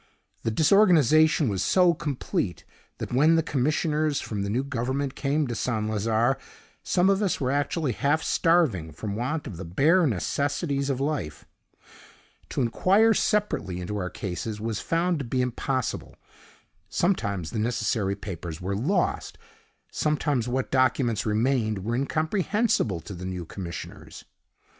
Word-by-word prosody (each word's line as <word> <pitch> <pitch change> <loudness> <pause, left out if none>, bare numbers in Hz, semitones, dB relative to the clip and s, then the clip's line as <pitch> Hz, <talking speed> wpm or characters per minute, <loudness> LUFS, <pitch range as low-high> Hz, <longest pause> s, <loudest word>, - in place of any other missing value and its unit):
The - - -1
disorganization 155 - +4
was 100 -3 -1
so 180 - +4
complete, 120 - -3 0.3
that - - -5
when 150 +6 +5
the 165 - +2
commissioners 150 +2 0
from 105 -3 -4
the 100 - -2
new 120 +6 0
Government 135 +1 -2
came 145 +2 0
to 120 - -3
St. 110 -2 -1
Lazare, 110 +4 +1 0.4
some 180 +1 +2
of 195 +1 +3
us 200 -4 0
were 130 -3 0
actually 145 0 0
half 145 +7 +1
starving 140 - +2
from 100 +6 -5
want 140 +8 -2
of 95 - -7
the 95 - -6
bare 150 - +3
necessities 140 - -1
of 135 -2 -1
life. 135 - -3 1.0
To 135 - -1
inquire 200 - +4
separately 205 - 0
into 90 +4 -4
our 90 -2 -2
cases 105 +4 -5
was 110 -1 -3
found 170 0 0
to 140 - -4
be 130 +2 -2
impossible. 125 0 -2 0.7
Sometimes 100 - 0
the 110 - -3
necessary 110 -3 0
papers 85 -5 -7
were 95 +2 -3
lost; 140 - -1 0.5
sometimes 145 -5 0
what 130 +1 -2
documents 130 -4 +2
remained 110 -2 0
were 115 - -1
incomprehensible 160 - 0
to 100 - -9
the 90 0 -7
new 90 -2 -5
commissioners. 85 0 -8
130 Hz, 145 wpm, -26 LUFS, 105-155 Hz, 1.0 s, when